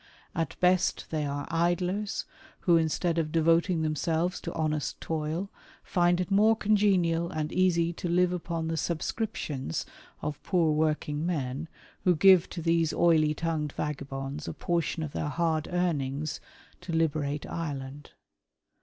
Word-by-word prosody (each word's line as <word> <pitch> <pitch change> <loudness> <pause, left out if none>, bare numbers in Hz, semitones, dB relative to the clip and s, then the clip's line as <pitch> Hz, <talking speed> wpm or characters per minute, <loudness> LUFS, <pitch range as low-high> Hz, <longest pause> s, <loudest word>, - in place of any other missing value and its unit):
At 165 0 -2
best 180 0 +2
they 155 -2 -1
are 145 0 -4
idlers 180 +5 0 0.4
who, 175 - +4
instead 165 +1 +1
of 155 -2 -1
devoting 165 +1 +3
themselves 160 +3 0
to 170 - -5
honest 155 -2 -1
toil, 160 +4 -3 0.3
find 175 0 +2
it 185 +2 -2
more 215 +3 +5
congenial 190 -6 +2
and 155 -1 -3
easy 170 -2 +2
to 175 - -4
live 180 +1 +3
upon 165 -2 -3
the 165 0 -2
''subscriptions" 155 - -2 0.4
of 150 -1 -3
poor 170 -5 +2
working 150 -1 0
men, 150 -3 -2 0.4
who 180 -1 +4
give 185 +1 +6
to 170 - -6
these 165 -1 +2
oily 155 -3 +3
tongued 155 -2 -2
vagabonds 140 0 -4
a - - -3
portion 170 -2 -1
of 150 - -4
their 150 - -2
hard 160 -1 0
earnings 155 -5 -1 0.2
" - - -28
to 175 - -6
liberate 150 -3 0
Ireland." 145 -3 -5
165 Hz, 145 wpm, -28 LUFS, 150-175 Hz, 0.4 s, give